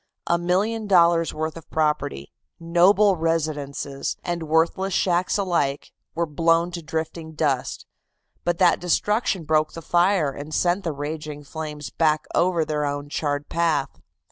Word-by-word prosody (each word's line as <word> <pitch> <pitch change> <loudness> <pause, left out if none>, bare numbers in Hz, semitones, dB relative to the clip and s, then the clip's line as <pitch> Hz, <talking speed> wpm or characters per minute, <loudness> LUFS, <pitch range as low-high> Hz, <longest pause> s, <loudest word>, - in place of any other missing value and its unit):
A 170 - +1
million 205 +6 0
dollars' 170 -3 +4
worth 155 0 -3
of 165 - -12
property, 150 - -1 0.3
noble 185 +4 +4
residences 150 -4 -2
and 175 -1 -2
worthless 170 +4 +1
shacks 180 +1 +1
alike, 170 -8 -1 0.2
were 170 +1 +1
blown 165 +2 +2
to 170 -1 -5
drifting 160 0 -5
dust, 145 -5 -1 0.6
but 175 -1 0
that 175 -2 +4
destruction 195 +2 0
broke 155 0 +1
the 165 - -7
fire 175 -3 +2
and 145 +3 -7
sent 180 +2 +1
the 165 - -1
raging 150 0 -6
flames 150 -2 -6
back 155 -1 +1
over 175 -2 +2
their 150 -1 -1
own 145 0 -3
charred 145 -1 -2
path. 165 -5 -1
165 Hz, 140 wpm, -23 LUFS, 150-175 Hz, 0.6 s, dollars